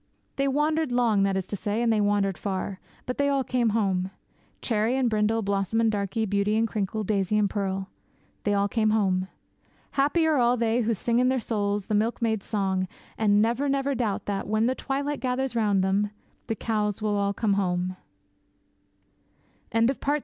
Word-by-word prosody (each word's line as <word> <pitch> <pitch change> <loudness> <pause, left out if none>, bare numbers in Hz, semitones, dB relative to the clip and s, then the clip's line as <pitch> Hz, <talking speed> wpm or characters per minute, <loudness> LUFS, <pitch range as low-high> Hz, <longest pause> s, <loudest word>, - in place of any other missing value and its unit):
They 275 0 +1
wandered 300 +1 +1
long, 235 -4 +3
that 195 -1 +2
is 190 - -2
to 205 - -5
say, 205 +2 -2
and 230 -1 +3
they 215 - +2
wandered 205 -2 +1
far. 190 0 -4 0.3
But 250 - -4
they 285 0 +3
all 275 -1 +1
came 245 -3 +1
home 195 -4 0 0.5
Cherry 230 +2 0
and 260 -2 +2
Brindle, 220 0 +1
Blossom 200 +2 0
and 225 -1 +3
Darkie, 205 +2 -1
Beauty 205 +1 +1
and 225 +1 +2
Crinkle, 215 0 -2
Daisy 200 0 0
and 210 -1 +3
Pearl 195 -1 -2 0.6
they 205 0 +1
all 200 0 +2
came 215 +1 +1
home. 190 -4 +1 0.6
Happy 295 +4 +2
are 315 -2 +3
all 245 0 +3
they 230 +1 +1
who 230 0 +1
sing 235 +4 +1
in 255 0 +3
their 260 0 +1
souls 205 -3 -1
the 215 - -3
milkmaid's 220 0 0
song, 190 -3 0 0.3
and 205 -1 +3
never, 240 +5 0
never 275 0 +1
doubt 230 -6 -2
that, 200 -1 -3
when 215 +2 +1
the 255 - +2
twilight 280 +2 -3
gathers 255 0 -1
round 205 -4 +2
them, 200 +2 +1 0.4
the 225 - -1
cows 210 -1 -1
will 210 -1 +1
all 200 0 +1
come 200 0 0
home! 185 -2 0
215 Hz, 180 wpm, -26 LUFS, 200-240 Hz, 0.6 s, long